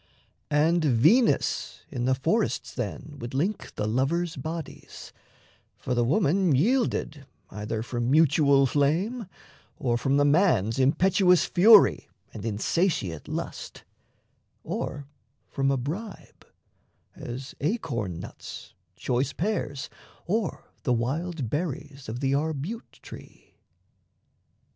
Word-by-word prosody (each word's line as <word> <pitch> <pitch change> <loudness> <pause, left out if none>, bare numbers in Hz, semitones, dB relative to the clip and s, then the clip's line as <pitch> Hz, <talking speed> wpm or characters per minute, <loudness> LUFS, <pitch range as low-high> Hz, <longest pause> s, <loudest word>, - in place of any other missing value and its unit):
And 160 +3 +3
Venus 155 - +2
in 125 -3 -2
the 130 0 +3
forests 170 - -1
then 130 +5 -5
would 120 +2 -6
link 185 +10 -2
The 105 - -2
lovers' 150 +9 0
bodies; 160 +3 -7 0.6
for 125 - -3
the 120 -1 +2
woman 165 - +2
yielded 155 - 0 0.2
Either 105 +2 -4
from 120 0 -2
mutual 140 -2 +4
flame, 170 - 0 0.5
or 120 -4 0
from 135 +2 +1
the 145 - +4
man's 145 - +3
Impetuous 180 +6 +4
fury 210 +3 +6 0.2
and 105 - -8
insatiate 110 - -1
lust, - - -6 0.8
Or 145 0 -4 0.4
from 135 0 0
a 135 - +2
bribe 175 - -7 0.7
as 130 +2 -7
acorn 140 - -2
nuts, - - -9 0.2
choice 130 +3 -1
pears, 160 -8 -2 0.4
Or 205 0 -2
the 125 - +1
wild 140 +5 -2
berries 145 -2 -4
of 120 +4 -5
the 135 -1 +1
arbute 160 +9 -3
tree. - - -13
145 Hz, 110 wpm, -26 LUFS, 125-175 Hz, 0.8 s, fury